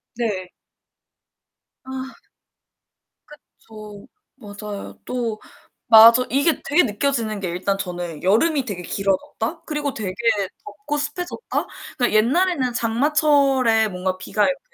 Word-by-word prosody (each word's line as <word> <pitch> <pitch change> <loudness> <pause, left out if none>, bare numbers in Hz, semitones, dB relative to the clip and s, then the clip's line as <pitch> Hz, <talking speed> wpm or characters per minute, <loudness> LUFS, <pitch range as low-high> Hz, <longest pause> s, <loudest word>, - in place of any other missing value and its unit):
네. 200 -6 -3 1.4
아. 265 - -7 1.1
그쵸. 215 -8 -14 0.3
맞아요. 205 -3 -9
또 235 -4 -3 0.5
맞어 230 +2 +8
이게 280 +3 +1
되게 300 +6 +3
느껴지는 225 -2 -1
게 185 -3 -3
일단 190 +3 -1
저는 175 -4 -5
여름이 260 - +2
되게 185 -6 -5
길어졌다. 195 +4 -2
그리고 295 -2 -3
되게 200 -4 -4 0.5
덥고 275 +8 -5
습해졌다. 325 +9 -3 0.3
그니까 245 -3 +1
옛날에는 265 +3 +2
장마철에 265 -2 +2
뭔가 185 -1 -3
비가 205 +3 -1
이렇게 275 +5 +1
230 Hz, 250 characters per minute, -21 LUFS, 205-280 Hz, 1.4 s, 맞어